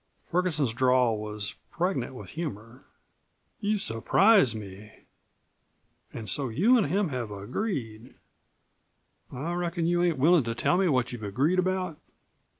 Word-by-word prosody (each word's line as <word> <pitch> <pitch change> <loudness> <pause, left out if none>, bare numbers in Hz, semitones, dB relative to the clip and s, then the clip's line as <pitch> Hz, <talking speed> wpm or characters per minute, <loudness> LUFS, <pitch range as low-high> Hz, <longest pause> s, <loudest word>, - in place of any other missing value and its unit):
Ferguson's 160 -8 +1
drawl 125 -3 +2
was 105 -1 -3 0.2
pregnant 165 -8 -2
with - - -9
humor. 125 -6 -7 0.7
"You 210 +1 0
surprise 190 - +3
me. 105 0 -9 1.2
An' 115 - -7
so 135 +4 -1
you 195 - +4
an' 225 -6 +3
him 185 +4 0
have 125 -5 -4
agreed. 115 - -5 1.2
I 150 +7 -4
reckon 175 -1 -2
you 175 +1 +2
ain't 175 -4 +1
willin' 160 +3 +4
to 115 0 -3
tell 175 - +1
me 190 -2 +3
what 130 -4 +1
you've 120 -2 -7
agreed 135 - +1
about?" 185 -3 -1
140 Hz, 135 wpm, -27 LUFS, 115-175 Hz, 1.2 s, you